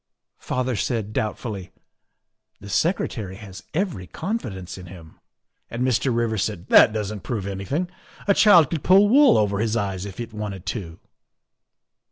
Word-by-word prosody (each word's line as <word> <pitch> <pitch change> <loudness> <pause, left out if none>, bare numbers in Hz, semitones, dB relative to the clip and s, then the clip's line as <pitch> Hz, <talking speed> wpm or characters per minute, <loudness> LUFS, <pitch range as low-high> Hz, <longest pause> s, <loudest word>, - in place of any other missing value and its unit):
" - - -61
Father 130 -1 -2
said 105 +1 -2
doubtfully, 105 -3 -3 0.5
' - - -51
The 100 - -11
Secretary 110 - -1
has 100 -2 -10
every 160 - -2
confidence 105 - -5
in 90 -1 -10
him,' 85 -3 -13 0.5
and 120 +2 -2
Mr. 130 +1 +1
Rivers 115 -3 0
said, 100 -5 -4
' - - -35
That - - +7
doesn't 105 -1 -3
prove 105 -3 -4
anything. 100 - -3 0.4
A 200 - +5
child 180 -8 +6
could 160 -5 -3
pull 195 +3 +6
wool 275 +2 +6
over 100 -2 +1
his 110 +1 0
eyes 95 -3 -2
if 100 - -10
it 115 -1 -6
wanted 105 -4 -6
to. 85 -8 -5
110 Hz, 165 wpm, -23 LUFS, 95-130 Hz, 0.5 s, That